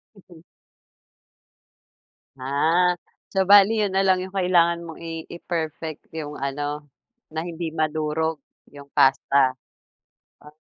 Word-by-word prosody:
Mhm. 175 -4 -17 2.0
Ah. 165 +7 +2 0.3
So, 195 -1 +1
bale 200 +1 +8
'yun 210 -3 0
na 190 - +2
lang 185 -1 +3
'yung 190 - -10
kailangan 175 -3 +3
mong 165 -1 -10
i 165 -1 -6
i-perfect, 160 -2 -5
'yung 150 -2 -5
ano, 145 +2 -4 0.4
na 160 +1 -4
hindi 170 -1 -4
madurog 155 0 -1 0.3
'yung 140 -1 -12
pasta. 135 0 +4 0.9
Ah 150 0 -16
160 Hz, 110 wpm, -23 LUFS, 150-180 Hz, 2.0 s, bale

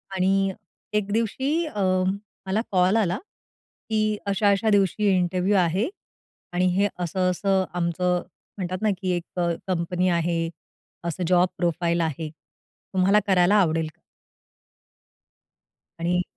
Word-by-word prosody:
आणि 195 +1 +2 0.5
एक 205 -1 -2
दिवशी 230 +5 0 0.2
अ, 210 -10 -4 0.7
मला 200 +3 +1
कॉल 185 +3 +3
आला 190 -5 +1 0.7
की, 215 -1 +1
अशा-अशा 200 +2 +2
दिवशी 205 0 +2
इंटरव्ह्यू 180 +3 +1
आहे 185 - +2 0.6
आणि 180 +1 +2
हे 200 +2 +3
असं-असं 185 +2 +1
आमचं 175 +1 0 0.4
म्हणतात 185 -1 -3
ना, 215 - +2
की 185 - 0
एक 175 +1 -6
अ, 175 -1 +2 0.2
कंपनी 180 0 0
आहे, 170 -1 0 0.6
असं 175 +2 -3
जॉब 180 0 +4
प्रोफाइल 170 0 0
आहे. 160 0 -2 0.6
तुम्हाला 190 +3 +4
करायला 185 +1 +4
आवडेल 165 -5 +2
का? - - -39 2.0
आणि 175 +2 +1
185 Hz, 115 wpm, -25 LUFS, 175-200 Hz, 2.0 s, जॉब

